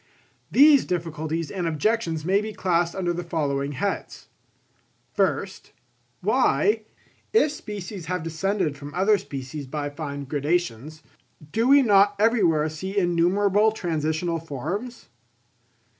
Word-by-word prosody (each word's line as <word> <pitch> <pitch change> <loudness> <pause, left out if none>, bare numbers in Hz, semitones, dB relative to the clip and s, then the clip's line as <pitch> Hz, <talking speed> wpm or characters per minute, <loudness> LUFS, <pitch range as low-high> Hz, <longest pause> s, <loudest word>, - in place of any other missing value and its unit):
These 285 0 +6
difficulties 165 -2 -3
and 180 -4 -2
objections 165 -1 -1
may 195 +3 +3
be 215 0 -5
classed 175 -3 0
under 180 -2 -1
the 175 +1 -4
following 145 -4 -2
heads: 200 +8 -4 0.8
First, - - -1 0.5
why, 415 - +2 0.5
if 370 -9 +4
species 200 - -7
have 180 -1 -2
descended 165 0 -1
from 145 +1 -10
other 200 +3 +3
species 135 +1 -7
by 145 +1 -4
fine 145 -1 -5
gradations, 150 0 -2 0.5
do 230 +2 +1
we 280 +1 +7
not 205 -2 +4
everywhere 195 -9 +3
see 190 +6 -6
innumerable 195 +4 +3
transitional 165 -3 -2
forms? 175 - -5
175 Hz, 115 wpm, -24 LUFS, 155-205 Hz, 0.8 s, we